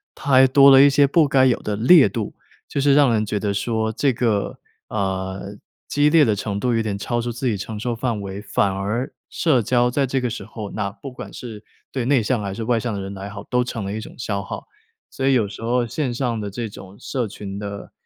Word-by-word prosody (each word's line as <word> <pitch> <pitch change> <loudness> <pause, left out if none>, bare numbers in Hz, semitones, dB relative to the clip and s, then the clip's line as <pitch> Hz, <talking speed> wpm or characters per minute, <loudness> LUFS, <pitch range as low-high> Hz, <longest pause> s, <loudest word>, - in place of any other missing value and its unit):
它 140 - -4
还 130 0 +7
多 140 +1 +7
了 135 0 +9
一 140 - +7
些 140 +1 +4
不 150 +2 +3
该 135 -1 +4
有 125 -2 +2
的 105 - -2
烈 130 - +6
度， 105 +1 -4 0.3
就 140 - -2
是 140 0 +4
让 140 -5 +5
人 110 -1 +1
觉 105 0 -2
得 100 0 -1
说 110 +2 -1
这 135 +5 +1
个， 115 -4 -1 0.3
呃， 95 0 -3 0.3
激 145 +1 +3
烈 155 -1 +5
的 110 -4 +2
程 100 0 -3
度 125 +3 0
有 115 - +2
点 105 -3 -2
超 120 +3 -2
出 120 +1 -3
自 120 +4 -5
己 115 - +1
承 105 +2 -6
受 120 +2 -2
范 115 -2 -2
围。 100 0 -6
反 100 -1 0
而 105 +7 -3 0.2
社 145 -7 +2
交 120 +2 +2
在 135 +1 +1
这 135 +1 0
个 125 -2 -2
时 - - -5
候， 110 -2 -7
那 105 -2 -2
不 120 +6 -10
管 125 - -9
是 110 -4 -9 0.3
对 130 -3 -2
内 130 -2 +3
向 110 +1 0
还 100 -1 -4
是 115 - -4
外 115 0 +1
向 120 +1 -3
的 100 - -3
人 95 +1 -6
来 100 +1 -7
好， 100 0 -8
都 125 +3 0
成 115 -4 -5
了 100 - -4
一 110 - -3
种 - - -11
消 100 -4 -2
耗。 - - -7 0.5
所 135 - -1
以 135 - +4
有 120 -5 +3
时 100 +2 -9
候 120 +2 +1
线 125 +2 -2
上 120 -2 -1
的 105 -1 -4
这 115 +3 -5
种 95 -1 -12
社 125 0 -3
群 100 -1 -7
的 100 -1 -7
115 Hz, 270 characters per minute, -22 LUFS, 100-130 Hz, 0.5 s, 了